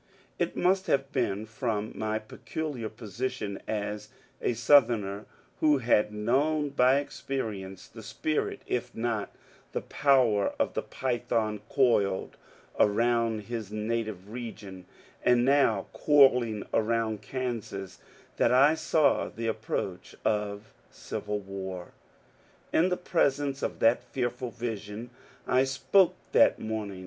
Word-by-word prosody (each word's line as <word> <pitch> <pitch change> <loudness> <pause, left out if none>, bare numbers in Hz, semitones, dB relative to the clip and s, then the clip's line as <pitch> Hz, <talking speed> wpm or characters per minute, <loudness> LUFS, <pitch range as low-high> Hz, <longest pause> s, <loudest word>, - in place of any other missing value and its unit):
It 175 -1 -1
must 190 +1 +2
have 135 0 +1
been 110 -6 -1
from 110 -1 -3
my 110 0 -2
peculiar 120 +2 -5
position 110 -2 -4
as 105 -1 -3 0.3
a - - +1
South 125 +2 +6
erner 105 -3 -3 0.3
who 150 -2 +4
had 115 -4 +2
known 140 +8 +1
by 130 -1 +4
experience 110 -9 -4
the 115 - -12
spirit 155 +7 -2
if 125 - -3
not 115 -2 -2 0.4
the - - -1
power 130 -8 +2
of - - 0
the - - -1
python 115 -4 -2
coiled 105 -8 +2 0.4
around 115 +1 +2
his 110 -2 -6
native 110 -2 -3
region, 105 -6 -8 0.4
and 125 0 +4
now 140 +1 +3
coiling 125 -7 +4
around 110 -1 +1
E[ansas, 115 -6 -4 0.4
that - - +3
I 135 +5 +6
saw 155 -1 +2
the 115 - -6
approach 110 -4 -3
of 105 0 -1 0.2
civil 105 0 -4
war. 95 -2 -6 0.8
In 175 +3 +4
the 180 - 0
presence 145 -5 0
of - - -2
that 115 +2 +4
fearful 125 -1 -3
vision 110 0 -6 0.3
I 130 +1 +3
spoke 135 +8 +3 0.2
that - - +5
morning. 110 -3 -4
115 Hz, 120 wpm, -28 LUFS, 105-135 Hz, 0.8 s, South